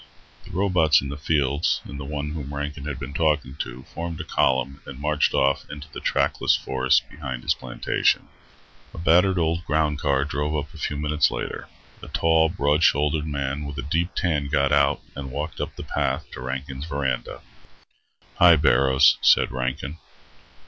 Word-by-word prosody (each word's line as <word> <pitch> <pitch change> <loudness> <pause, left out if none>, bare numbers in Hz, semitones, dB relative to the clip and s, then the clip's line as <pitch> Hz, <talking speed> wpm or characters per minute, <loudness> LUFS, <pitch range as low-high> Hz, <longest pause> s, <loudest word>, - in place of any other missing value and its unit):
The - - -13
robots 90 -6 +3
in 70 - -5
the 70 - -5
fields 75 0 +1
and 70 - -8
the 70 - -6
one 75 +1 -4
whom 75 -2 -6
Rankin 75 0 -5
had 70 -4 -4
been 70 0 -7
talking 75 -3 +1
to 65 -2 -6
formed 85 -1 -5
a - - -3
column 70 -1 0
and 65 - -8
marched 75 +1 +1
off 70 0 +1
into 75 +1 -8
the - - -7
trackless - - +1
forests 65 0 +2
behind 65 -5 -6
his - - +2
plantation. - - 0 0.7
A - - -10
battered 90 +3 +3
old 85 +1 0
ground 75 -2 0
car 70 -1 +1
drove 75 +1 -2
up 75 +3 -5
a 80 - -11
few 75 - -2
minutes 75 +1 +2
later. - - -5 0.3
A - - -9
tall, 80 0 +3
broad 75 -2 +1
shouldered 75 0 +2
man 70 0 -3
with 70 0 -6
a 70 - -3
deep 85 +5 -1
tan 75 -5 0
got 70 -1 +1
out 70 0 +3
and 70 -1 -6
walked 75 +4 -5
up - - -4
the - - -7
path - - -1
to - - -8
Rankin's 65 +2 -5
verandah. 70 -5 -3 1.0
"Hi, 85 -1 +8
Barrows," 70 -2 +4
said - - +5
Rankin. 65 +4 -3
75 Hz, 175 wpm, -24 LUFS, 70-80 Hz, 1.0 s, Hi